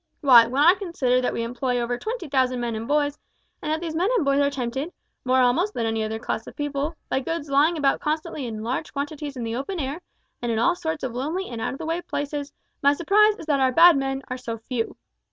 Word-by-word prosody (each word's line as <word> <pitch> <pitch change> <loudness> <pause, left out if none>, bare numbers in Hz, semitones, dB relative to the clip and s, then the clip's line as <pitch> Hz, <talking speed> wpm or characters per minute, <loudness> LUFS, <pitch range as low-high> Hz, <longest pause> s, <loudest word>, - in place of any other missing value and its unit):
Why, 245 -5 +8
when 265 +4 +1
I 345 +3 +8
consider 310 -11 0
that 250 - 0
we 230 - -2
employ 245 +1 -1
over 240 +1 -1
twenty 435 - -5
thousand 260 -2 +1
men 240 -1 -2
and 220 +1 -5
boys, 290 0 +1 0.4
and 305 - -2
that 315 +1 -1
these 330 -2 -4
men 360 +5 +1
and 405 - +1
boys 275 0 +3
are 285 0 +3
tempted, 270 +3 -3 0.3
more 255 0 +2
almost 325 +12 +2
than 230 - -1
any 225 -1 0
other 220 +1 -3
class 220 0 -4
of - - -10
people, 290 +2 -2
by - - 0
goods 305 +1 -4
lying 305 +5 +4
about 280 -3 +1
constantly 305 -3 -2
in 220 -2 -5
large 255 +6 -3
quantities 285 0 -4
in 240 - -4
the 225 0 -3
open 335 +9 -4
air, 285 +4 -3 0.4
and 240 -1 -1
in 225 - 0
all 235 +10 +3
sorts 320 -3 -4
of 255 -3 -3
lonely 315 +10 -3
and 230 -2 -6
out - - -2
of - - -7
the 325 - -6
way 330 +2 -1
places, 290 -2 -4 0.3
my 280 +1 +5
surprise 415 +7 +4
is - - -9
that 290 -3 +1
our 260 -1 +3
bad 335 +4 +7
men 270 0 -2
are 255 -1 -4
so 230 -2 -5
few. 225 +1 -4
280 Hz, 245 wpm, -24 LUFS, 245-320 Hz, 0.4 s, Why